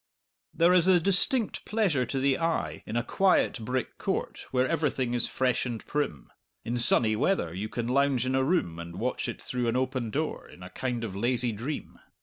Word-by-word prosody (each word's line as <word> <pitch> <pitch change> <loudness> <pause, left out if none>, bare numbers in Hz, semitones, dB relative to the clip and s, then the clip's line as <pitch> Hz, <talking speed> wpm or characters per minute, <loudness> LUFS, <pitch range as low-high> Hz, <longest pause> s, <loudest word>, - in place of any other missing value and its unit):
There 170 +2 +4
is 180 -1 +4
a 185 -2 +6
distinct 200 - +1
pleasure 185 - 0
to 135 - -2
the 135 0 +2
eye 85 - -1
in 115 - -2
a 120 - +1
quiet 190 -2 +2
brick 125 +2 -3
court - - -3
where 130 0 +1
everything 140 -6 0
is 120 -1 +1
fresh 130 -1 0
and 120 -3 -5
prim; 145 - -3 0.3
in 120 +1 -1
sunny 115 -2 +4
weather 105 - 0
you 100 +4 -4
can 120 -1 -3
lounge 135 -1 +2
in 130 - -1
a 130 0 +2
room 130 - 0
and 85 0 -8
watch 125 +6 -2
it - - -6
through 125 -1 -2
an 115 - 0
open 130 -2 -1
door, 155 +7 -3
in 90 - -13
a 90 - -10
kind 120 +2 -3
of 100 -4 -5
lazy 120 +3 +1
dream. 120 +8 -6
125 Hz, 200 wpm, -28 LUFS, 115-150 Hz, 0.3 s, a